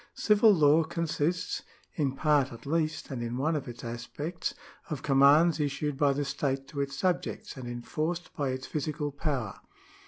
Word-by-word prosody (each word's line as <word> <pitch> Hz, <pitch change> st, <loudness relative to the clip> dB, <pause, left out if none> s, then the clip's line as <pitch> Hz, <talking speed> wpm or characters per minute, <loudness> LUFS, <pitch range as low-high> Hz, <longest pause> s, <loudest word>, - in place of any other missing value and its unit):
Civil 210 Hz, +1 st, +5 dB
law 155 Hz, -3 st, +5 dB
consists 165 Hz, 0 st, -1 dB, 0.3 s
(in 140 Hz, -4 st, 0 dB
part 145 Hz, -2 st, +2 dB
at 115 Hz, +2 st, -11 dB
least, 155 Hz, +1 st, -1 dB
and 125 Hz, -3 st, -3 dB
in 120 Hz, +1 st, -3 dB
one 155 Hz, +5 st, +1 dB
of 145 Hz, -2 st, -3 dB
its 120 Hz, -1 st, -8 dB
aspects) 125 Hz, +8 st, -4 dB, 0.3 s
of 150 Hz, -4 st, -4 dB
commands 145 Hz, +4 st, +5 dB
issued 145 Hz, 0 st, -1 dB
by 145 Hz, 0 st, +3 dB
the 140 Hz, +1 st, -1 dB
state 135 Hz, -1 st, -2 dB
to 145 Hz, -2 st, -3 dB
its 140 Hz, 0 st, -3 dB
subjects, 180 Hz, +4 st, -1 dB
and 130 Hz, -3 st, -7 dB
enforced 155 Hz, +8 st, -3 dB
by 140 Hz, -2 st, -1 dB
its 130 Hz, 0 st, -3 dB
physical 150 Hz, 0 st, -3 dB
power. 140 Hz, -8 st, -3 dB
145 Hz, 165 wpm, -29 LUFS, 135-160 Hz, 0.3 s, Civil